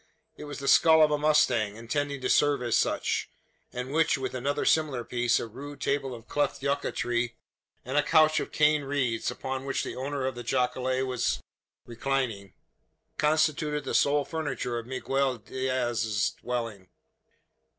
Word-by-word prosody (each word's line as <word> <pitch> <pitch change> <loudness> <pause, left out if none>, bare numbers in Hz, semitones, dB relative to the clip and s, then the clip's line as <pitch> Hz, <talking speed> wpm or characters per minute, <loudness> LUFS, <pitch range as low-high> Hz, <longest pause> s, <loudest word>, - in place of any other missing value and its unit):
It - - -9
was 145 - -7
the 140 - -5
skull 160 +1 +6
of 150 - +4
a 150 - +2
mustang, 130 -9 +3
intended 140 +4 -3
to - - +1
serve 145 -3 +3
as 120 -2 +1
such; - - 0 0.4
and 125 +2 -5
which, 160 0 +3
with 130 -1 -4
another 135 +3 -1
similar 145 -6 +2
piece, 120 0 +1
a - - -3
rude 140 +5 -9
table 135 -2 -1
of 115 - -13
cleft 145 -2 -1
yucca 140 0 0
tree, 120 0 -1 0.5
and 130 +3 -2
a - - +5
couch 155 +1 +4
of - - -5
cane 150 0 +3
reeds, 135 -5 -1
upon 130 0 -4
which 135 0 -1
the - - -5
owner 135 +1 -3
of 130 - -1
the 120 - -7
jacale 130 +1 0
was 125 -2 -1 0.5
reclining, 120 -4 -2 0.6
constituted 150 -1 +1
the - - -4
sole 145 0 +3
furniture 130 -6 -3
of 115 - -10
Miguel 130 0 -1
Diaz's 120 -3 -1
dwelling. 115 -7 -5
130 Hz, 160 wpm, -28 LUFS, 120-145 Hz, 0.6 s, skull